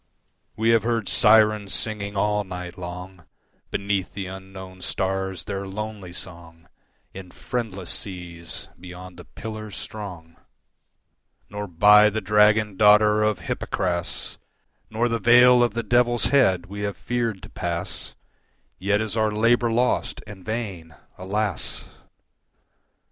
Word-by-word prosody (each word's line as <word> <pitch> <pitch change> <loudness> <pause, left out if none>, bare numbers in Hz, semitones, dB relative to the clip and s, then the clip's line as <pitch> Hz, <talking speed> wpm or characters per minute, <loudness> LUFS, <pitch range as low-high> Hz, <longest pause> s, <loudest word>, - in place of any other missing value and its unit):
We 110 +2 +1
have 115 -1 +4
heard 115 -1 -1
Syrens 105 -3 +4
singing 100 -2 -3
all 105 +1 +1
night 90 -2 -7
long 90 0 -8 0.4
Beneath 100 -1 -2
the 100 -1 -4
unknown 95 0 -10
stars 95 -1 -2
their 100 0 -4
lonely 105 -2 -6
song 85 -2 -11 0.5
In 95 -1 -9
friendless 100 -5 -4
seas 85 -3 -5
beyond 90 0 -10
the 90 - -11
Pillars 110 -2 -8
strong. 90 -6 -8 1.1
Nor 105 0 -5
by 105 +4 +6
the 110 - -2
dragon 105 0 +3
daughter 105 +1 +6
of 105 -2 +1
Hypocras 85 -2 -3 0.5
Nor 115 +2 0
the 115 -1 -1
vale 125 +1 +7
of 120 -3 +1
the 115 - -1
Devil's 120 0 +2
head 95 -11 +4
we 100 +2 -8
have 100 -1 -3
feared 115 -6 -2
to 100 - -10
pass, 90 -1 -4 0.6
Yet 105 +2 +1
is 110 0 -3
our 110 -1 +2
labour 115 +2 +2
lost 125 +2 0
and 100 -3 -11
vain, 95 -8 -5 0.2
alas! 100 -1 -2
100 Hz, 125 wpm, -24 LUFS, 90-110 Hz, 1.1 s, vale